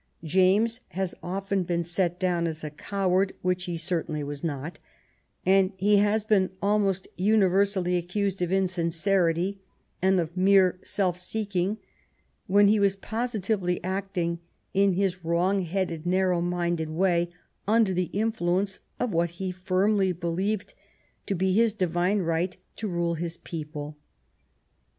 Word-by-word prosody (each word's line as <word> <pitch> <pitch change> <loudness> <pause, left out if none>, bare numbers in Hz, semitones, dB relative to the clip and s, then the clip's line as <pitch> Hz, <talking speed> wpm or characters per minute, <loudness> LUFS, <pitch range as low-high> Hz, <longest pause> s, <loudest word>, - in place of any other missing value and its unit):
James 190 +8 +3
has 190 -1 -3
often 195 +2 -2
been 170 -1 -1
set 175 +1 -1
down 175 -2 +1
as 160 -1 -5
a 150 - -4
coward, 190 +3 0
which 180 0 0
he 175 -2 -3
certainly 165 -3 -2
was 145 +1 -6
not, 150 +1 -4 0.7
and 190 +1 +4
he 205 +2 +4
has 210 +1 +2
been 205 -3 +2
almost 200 -2 +1
uni 205 +2 +4
versally 185 -1 +2
accused 190 +2 -2
of 175 0 0
insincerity 180 0 +1 0.4
and 190 0 +3
of 170 0 -3
mere 185 -1 +4
self 185 -3 -1
seeking, 200 0 -2 0.7
when 200 +2 +5
he 210 +1 +4
was 200 -1 +3
positively 210 -4 -1
acting 185 -3 -2 0.3
in 195 0 +3
his 185 -1 -1
wrong 175 +4 +1
headed, 175 -2 -2
nar 185 +1 +2
row 175 -1 +1
minded 175 -2 -1
way 175 +1 +1 0.4
under 215 -2 +3
the 180 -1 -1
influence 195 -3 0 0.2
of 245 -2 0
what 170 +1 +2
he 190 0 -2
firmly 185 +2 +1
believed 180 +4 -2 0.5
to 200 - 0
be 185 +1 +1
his 225 +1 +3
divine 185 +1 +1
right 170 +2 -1 0.2
to 220 - -4
rule 170 -2 0
his 170 0 -4
people. 150 -2 -6
185 Hz, 140 wpm, -27 LUFS, 175-200 Hz, 0.7 s, when